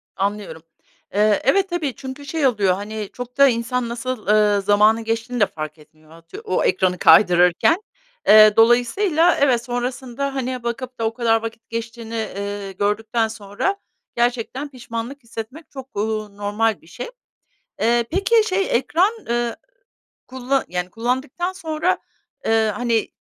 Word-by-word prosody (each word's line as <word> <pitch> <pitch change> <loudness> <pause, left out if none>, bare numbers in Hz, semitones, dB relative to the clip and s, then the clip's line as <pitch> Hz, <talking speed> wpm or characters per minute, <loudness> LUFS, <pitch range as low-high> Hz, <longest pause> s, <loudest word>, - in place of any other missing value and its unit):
Anlıyorum. 200 -3 -3 0.5
Eee, 210 +1 +3
evet 385 +9 +3
tabii 320 -7 -2
çünkü 265 +1 -8
şey 300 -1 +1
oluyor, 200 -7 +2
hani, 210 +1 -5
çok 245 +1 -8
da 280 - +7
insan 235 0 -1
nasıl, 240 -2 -5
eee, 210 -1 +4
zamanın 210 +3 +4
geçtiğini 225 +2 -2
de 205 - +7
fark 155 0 -7
etmiyor, 155 0 -22
eee, - - -14
atıyor 165 +1 -12
o 185 - +1
ekranı 185 -1 +1
kaydırırken. 180 - +5 0.5
Eee, 215 0 +8
dolayısıyla 300 - +4
evet 250 -4 +3
sonrasında, 255 +2 -3
hani, 255 -2 -3
bakıp 245 +1 -5
da 225 - 0
o 225 - 0
kadar 225 -1 +2
vakit 225 0 -8
geçtiğini, 230 0 -6
eee, 200 -2 -4
gördükten 220 +3 0
sonra 220 - -3 0.4
gerçekten 245 +4 -1
pişmanlık 240 +1 -7
hissetmek 230 +7 -8
çok, 265 -1 -9
eee, 205 - 0 0.4
normal 205 -1 0
bir 160 - -21
şey. 245 - -7 0.7
Eee, 235 +1 +3
peki 395 +6 +3
şey 385 +1 +1
ekran, 345 - +2 0.2
eee, 235 0 -1 0.7
kulla 260 +1 -1
eee, 180 - -9
yani, 180 0 -2
kullandıktan 260 - -2
sonra, 330 -1 -1 0.5
eee, 220 -1 +2
hani, 235 -3 0
230 Hz, 145 wpm, -21 LUFS, 210-260 Hz, 0.7 s, Eee